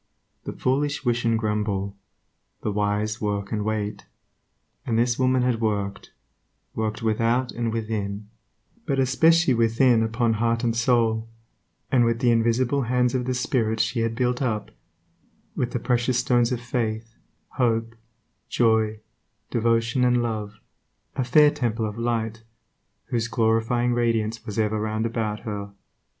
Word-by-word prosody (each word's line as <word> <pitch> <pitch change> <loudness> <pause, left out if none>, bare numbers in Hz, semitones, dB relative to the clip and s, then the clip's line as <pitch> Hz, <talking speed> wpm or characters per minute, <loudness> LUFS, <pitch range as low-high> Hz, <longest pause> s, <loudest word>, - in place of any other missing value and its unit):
The - - -4
foolish 145 +2 -1
wish 120 0 +1
and 115 -1 +3
grumble; 105 -2 -2 0.7
the 105 - -1
wise, 105 +1 -1
work 100 -1 -2
and 105 -2 -1
wait. 105 -1 -3 0.8
And 115 -2 -1
this 120 +1 +1
woman 130 -1 +3
had 120 -2 0
worked; 100 -3 -2 0.6
worked 110 0 -3
without 115 +3 +1
and 115 -1 -2
within, 105 -2 -3 0.6
but 140 -3 0
especially 160 +4 +4
within 115 +1 +3
upon 115 +1 +1
heart 115 +1 +1
and 115 -1 +1
soul; 115 -1 +1 0.6
and 125 -2 +4
with 115 0 +2
the 120 -2 +3
invisible 120 +4 +2
hands 125 0 +1
of 125 -2 -1
the 130 0 -1
spirit 115 -3 0
she 110 +2 0
had 115 0 -1
built 125 +1 0
up, 110 -5 -2 0.8
with 120 - -1
the 125 - -2
precious 120 +1 +1
stones 120 -1 +2
of 125 - -1
faith, 115 -2 -3 0.4
hope, 115 -2 +1 0.6
joy, 110 -2 +2 0.5
devotion, 115 +1 +1
and 125 -1 +3
love, 105 -2 -4 0.6
a 130 - 0
fair 150 +4 +5
temple 120 -6 -1
of 105 +1 -5
light, 115 -1 -2 0.7
whose 115 -2 0
glorifying 115 +2 +1
radiance 115 -2 0
was 105 - -5
ever 110 -1 +1
round 110 +1 -1
about 110 -2 -2
her. 100 -2 -6
115 Hz, 140 wpm, -24 LUFS, 110-125 Hz, 0.8 s, fair